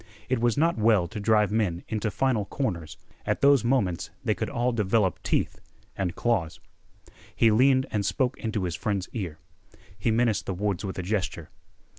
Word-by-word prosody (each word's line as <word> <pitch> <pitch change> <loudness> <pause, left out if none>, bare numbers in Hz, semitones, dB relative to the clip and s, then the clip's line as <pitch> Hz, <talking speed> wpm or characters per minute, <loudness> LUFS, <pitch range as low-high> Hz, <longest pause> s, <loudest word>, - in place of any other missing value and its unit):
It 130 -2 +1
was 120 +1 +1
not 165 -3 +2
well 105 -5 +4
to 110 +2 -6
drive 105 -1 +3
men 100 -6 0
into 110 0 -1
final 115 -2 0
corners; 90 - -3 0.3
at - - -1
those 140 -4 +5
moments 115 -9 0 0.2
they - - +3
could - - -3
all 120 +1 0
develop 105 -3 +1
teeth - - -1 0.3
and 95 -2 -2
claws. 95 -10 0 0.8
He 115 - +4
leaned 130 +4 +4
and 105 -2 0
spoke 125 +5 0
into 110 -3 -2
his 90 -2 -2
friend's 100 +1 -2
ear. 90 -9 -4 0.6
He 100 +4 -1
menaced 115 -1 +1
the 95 - -2
woods 100 -1 -1
with 95 -2 -4
a 90 - -3
gesture. 90 -5 -3
105 Hz, 175 wpm, -26 LUFS, 95-120 Hz, 0.8 s, those